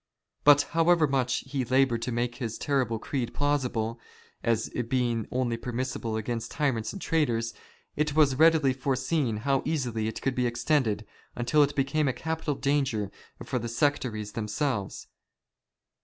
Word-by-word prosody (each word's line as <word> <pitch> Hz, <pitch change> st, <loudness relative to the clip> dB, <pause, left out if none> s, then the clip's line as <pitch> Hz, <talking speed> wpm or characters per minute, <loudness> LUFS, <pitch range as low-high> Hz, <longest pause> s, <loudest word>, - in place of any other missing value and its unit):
But 145 Hz, 0 st, +7 dB
however 165 Hz, 0 st, +4 dB
much 130 Hz, -3 st, 0 dB
he 135 Hz, -1 st, -2 dB
laboured 130 Hz, -1 st, +2 dB
to 125 Hz, -, -2 dB
make 120 Hz, 0 st, -1 dB
his 115 Hz, -4 st, -4 dB
terrible 130 Hz, -6 st, 0 dB
creed 120 Hz, +1 st, -3 dB
plausible, 125 Hz, -6 st, 0 dB, 0.4 s
as 115 Hz, -1 st, +1 dB, 0.2 s
being 120 Hz, -4 st, 0 dB
only 125 Hz, -2 st, -1 dB
permissible 120 Hz, -2 st, -3 dB
against 115 Hz, +1 st, -3 dB
tyrants 135 Hz, -8 st, -1 dB
and 195 Hz, -, -7 dB
traitors, 120 Hz, -10 st, 0 dB, 0.4 s
it 150 Hz, -1 st, 0 dB
was 150 Hz, -4 st, +5 dB
readily 160 Hz, -4 st, +5 dB
foreseen 130 Hz, -1 st, 0 dB
how 135 Hz, -1 st, +2 dB
easily 125 Hz, -8 st, -1 dB
it 110 Hz, -, -4 dB
could 135 Hz, -, -1 dB
be 125 Hz, -1 st, +1 dB
extended, 120 Hz, -3 st, 0 dB, 0.3 s
until 125 Hz, +5 st, +2 dB
it 145 Hz, 0 st, +2 dB
became 140 Hz, +2 st, +1 dB
a 130 Hz, -, +1 dB
capital 160 Hz, -1 st, -2 dB
danger 135 Hz, -8 st, 0 dB, 0.3 s
for 125 Hz, -, -1 dB
the 120 Hz, 0 st, -4 dB
sectaries 120 Hz, -5 st, 0 dB
themselves. 110 Hz, 0 st, -2 dB
130 Hz, 145 wpm, -28 LUFS, 115-145 Hz, 0.4 s, But